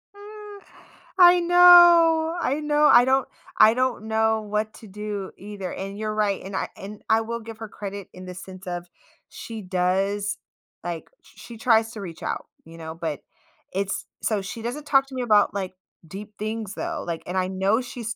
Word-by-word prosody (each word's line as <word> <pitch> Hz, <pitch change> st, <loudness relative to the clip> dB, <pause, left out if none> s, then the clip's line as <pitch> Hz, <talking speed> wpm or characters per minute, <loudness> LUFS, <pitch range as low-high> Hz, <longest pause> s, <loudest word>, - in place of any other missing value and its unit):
Ah. 415 Hz, 0 st, -11 dB, 0.6 s
I 355 Hz, 0 st, +8 dB
know, 345 Hz, -2 st, +7 dB
I 285 Hz, +1 st, 0 dB
know. 300 Hz, 0 st, +2 dB
I 240 Hz, +1 st, +7 dB
don't 265 Hz, 0 st, +2 dB, 0.3 s
I 220 Hz, -, +8 dB
don't 250 Hz, -3 st, -1 dB
know 220 Hz, 0 st, +1 dB
what 210 Hz, +1 st, -3 dB
to 220 Hz, -, -13 dB
do 205 Hz, 0 st, -6 dB
either, 200 Hz, -2 st, -7 dB
and 195 Hz, +1 st, -6 dB
you're 215 Hz, 0 st, -3 dB
right, 210 Hz, -2 st, 0 dB
and 190 Hz, 0 st, -7 dB
I -, -, -2 dB
and 205 Hz, +2 st, -10 dB
I 220 Hz, +1 st, +4 dB
will 235 Hz, +1 st, -4 dB
give 225 Hz, 0 st, -10 dB
her 225 Hz, -, -6 dB
credit 200 Hz, -1 st, -7 dB
in 185 Hz, 0 st, -10 dB
the 180 Hz, -, -7 dB
sense 185 Hz, +1 st, -11 dB
of 175 Hz, 0 st, -5 dB, 0.4 s
she 225 Hz, -2 st, -8 dB
does, 195 Hz, +2 st, -1 dB, 0.5 s
like, 170 Hz, -2 st, -5 dB
sh -, -, -21 dB
sh -, -, -15 dB
she 235 Hz, -2 st, -10 dB
tries 225 Hz, -1 st, +3 dB
to 210 Hz, -, -8 dB
reach 170 Hz, -4 st, -9 dB
out, -, -, -4 dB, 0.2 s
you 165 Hz, 0 st, -13 dB
know, 160 Hz, 0 st, -7 dB
but 155 Hz, -3 st, -4 dB, 0.5 s
it's 195 Hz, +1 st, -2 dB, 0.2 s
so, 210 Hz, -3 st, 0 dB
she 195 Hz, +4 st, -7 dB
doesn't 255 Hz, +6 st, -5 dB
talk 270 Hz, -1 st, +3 dB
to 265 Hz, -, -10 dB
me 255 Hz, -, -2 dB
about 210 Hz, -4 st, +3 dB
like 190 Hz, -2 st, -4 dB, 0.3 s
deep 205 Hz, +4 st, -9 dB
things 215 Hz, -1 st, -4 dB
though, 330 Hz, -2 st, -4 dB
like, 165 Hz, -1 st, -4 dB
and 180 Hz, +2 st, -4 dB
I 185 Hz, -, +1 dB
know 190 Hz, +5 st, +1 dB
she's 235 Hz, -2 st, -6 dB
215 Hz, 195 wpm, -24 LUFS, 195-255 Hz, 0.6 s, I